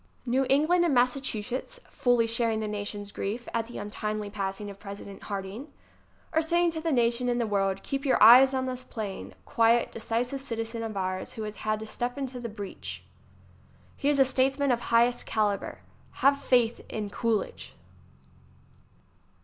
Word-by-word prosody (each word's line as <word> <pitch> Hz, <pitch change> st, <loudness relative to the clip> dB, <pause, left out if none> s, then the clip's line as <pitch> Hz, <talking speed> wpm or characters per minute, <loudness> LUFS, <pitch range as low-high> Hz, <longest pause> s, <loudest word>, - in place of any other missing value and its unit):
6 -, -, -25 dB
New 265 Hz, +2 st, +2 dB
England 310 Hz, +6 st, +4 dB
and 325 Hz, -6 st, +2 dB
Massachusetts, 255 Hz, -, -1 dB
fully 245 Hz, -2 st, +2 dB
sharing 230 Hz, -1 st, +2 dB
the 215 Hz, -, -2 dB
nation's 205 Hz, -1 st, -5 dB
grief 220 Hz, +6 st, -4 dB
at 225 Hz, -1 st, -1 dB
the 240 Hz, -, -8 dB
untimely 210 Hz, 0 st, -4 dB
passing 200 Hz, 0 st, -3 dB
of 200 Hz, -1 st, -9 dB
Pres 200 Hz, 0 st, -8 dB
ident 200 Hz, -1 st, -10 dB
Harding, 200 Hz, +6 st, -5 dB, 0.7 s
are 320 Hz, -, +3 dB
saving 340 Hz, +1 st, +2 dB
to 320 Hz, -1 st, -4 dB
the 325 Hz, 0 st, -1 dB
nation 240 Hz, -1 st, +2 dB
and 240 Hz, 0 st, +1 dB
the 235 Hz, -, +1 dB
world: 195 Hz, -2 st, 0 dB
"Keep 275 Hz, 0 st, -3 dB
your 270 Hz, -, +3 dB
eyes 250 Hz, +5 st, +9 dB
on 260 Hz, -1 st, -1 dB
this 255 Hz, -1 st, -4 dB
plain, 210 Hz, -6 st, -6 dB
quiet, 230 Hz, +1 st, +3 dB
de -, -, -8 dB
cisive 245 Hz, +5 st, -1 dB
citizen 230 Hz, -3 st, -4 dB
of 220 Hz, -2 st, -4 dB
ours 185 Hz, 0 st, -3 dB
who 220 Hz, -, -5 dB
has 210 Hz, 0 st, -6 dB
had 215 Hz, 0 st, -1 dB
to -, -, -5 dB
step 245 Hz, +4 st, -4 dB
into 265 Hz, -2 st, -4 dB
the 235 Hz, -1 st, -5 dB
breach. 205 Hz, -2 st, -7 dB, 0.9 s
He 280 Hz, -, 0 dB
is 290 Hz, -, +3 dB
a 270 Hz, -, +7 dB
statesman 270 Hz, +1 st, +2 dB
of 240 Hz, -, +2 dB
highest 240 Hz, +1 st, +2 dB
calibre. 210 Hz, -2 st, -1 dB, 0.4 s
Have 280 Hz, +1 st, +3 dB
faith 240 Hz, -3 st, +2 dB
in 210 Hz, -2 st, -4 dB
Coolidge!" 225 Hz, -2 st, -2 dB
230 Hz, 175 wpm, -28 LUFS, 210-260 Hz, 0.9 s, eyes